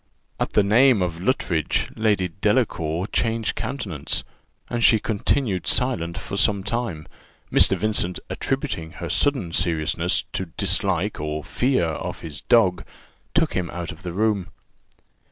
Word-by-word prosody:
At - - -2
the 105 - +4
name 115 +1 +5
of 85 -2 -3
Luttridge, 90 - 0
Lady 105 -4 +1
Delacour 95 -7 +1
changed 115 -1 +1
countenance, 110 - -3 0.4
and 120 -1 -2
she 115 - +7
continued 105 -1 0
silent 85 -10 +1
for 100 - -5
some 100 -1 +2
time. 105 -8 -3 0.4
Mr. - - +5
Vincent, 105 -4 0
attributing 80 0 -3
her - - -6
sudden 130 - +1
seriousness 85 +1 +1
to 95 - -2
dislike 95 0 +1
or 75 0 -3
fear 130 -7 +1
of 80 -1 -4
his 80 -2 -7
dog, 95 -7 +3 0.5
took - - +2
him 90 -2 -1
out 85 -1 -5
of 80 - -12
the 90 -2 -5
room. 100 -1 0
95 Hz, 135 wpm, -23 LUFS, 85-110 Hz, 0.5 s, she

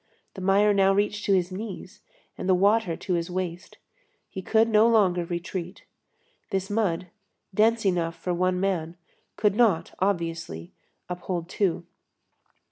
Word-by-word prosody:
The 190 - -8
mire 200 +2 +4
now 195 -1 +4
reached 210 +1 0
to 200 - +3
his 180 0 0
knees, 190 -1 -7 0.3
and 185 - -4
the 185 - +5
water 200 -2 +2
to 185 - -3
his 170 0 -1
waist. 180 -1 -5 0.5
He 190 - -5
could 220 +4 +3
no 220 0 +5
longer 190 -7 +3
retreat. 175 +1 -5 0.6
This 195 -1 -2
mud, 185 -5 0 0.4
dense 220 +2 +3
enough 170 -3 +1
for 175 +2 -3
one 180 +1 +1
man, 175 -3 -1 0.4
could 205 -2 +2
not, 205 -8 +2
obviously, 165 - -2 0.3
uphold 180 -1 -4
two. 185 -2 -1
185 Hz, 140 wpm, -26 LUFS, 175-205 Hz, 0.6 s, the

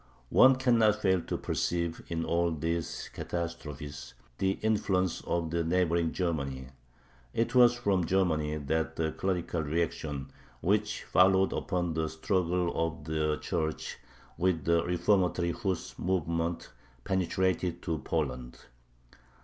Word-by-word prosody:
One 130 0 +7
cannot 120 -5 +4
fail 95 -3 +2
to - - -3
perceive 85 -1 -1
in 80 -1 -2
all 85 0 +1
these 80 +1 -3
catastrophes 75 -4 -5 0.2
the 95 0 +2
influence 95 -5 +1
of 85 -1 -1
neighboring 85 -1 +1
Germany. 70 -7 -2 0.7
It 115 +1 0
was 120 -1 +7
from 100 -8 +1
Germany 80 -5 +1
that 80 +2 -1
the 80 -1 0
clerical 90 -2 -1
reaction 75 -3 -2 0.3
which 105 +3 0
followed 95 +1 +4
upon 90 -3 -1
the 80 -1 -1
struggle 90 +1 0
of 80 -1 -2
the 75 0 0
Church 80 -3 -2 0.4
with 85 -4 +1
the 85 0 +3
reformatory 90 0 +1
Huss 95 +1 -3
movement 85 -2 -1 0.3
penetrated 95 -1 0
to 80 -2 -2
Poland. 65 -4 -3
85 Hz, 115 wpm, -30 LUFS, 80-95 Hz, 0.7 s, One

